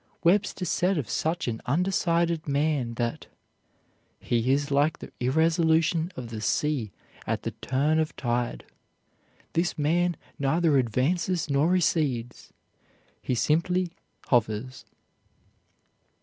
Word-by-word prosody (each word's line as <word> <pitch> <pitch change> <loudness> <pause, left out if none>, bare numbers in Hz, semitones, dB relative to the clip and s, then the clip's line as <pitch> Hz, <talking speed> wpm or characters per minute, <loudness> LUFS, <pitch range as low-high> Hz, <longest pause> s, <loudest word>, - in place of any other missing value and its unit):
Webster 185 +1 +2
said 180 +2 +1
of 140 -7 -2
such 160 +8 -1
an 115 -2 -3
undecided 170 +1 +1
man 140 -4 0
that 120 0 -3 0.9
"he 120 +2 0
is 145 +1 +1
like 145 +3 +2
the - - -10
irresolution 160 +4 +2
of 125 -2 -7
the 110 -1 -5
sea 130 -2 0 0.4
at - - -1
the - - -2
turn 145 +5 +1
of 155 0 -1
tide. 120 -1 -2 0.9
This 170 +2 0
man 170 +3 +1 0.2
neither 150 +1 +3
advances 155 - 0
nor 140 +4 +3
recedes; 150 -9 0 0.7
he 125 - -1
simply 175 +7 +1 0.4
hovers." 120 +1 0
150 Hz, 110 wpm, -27 LUFS, 125-170 Hz, 0.9 s, neither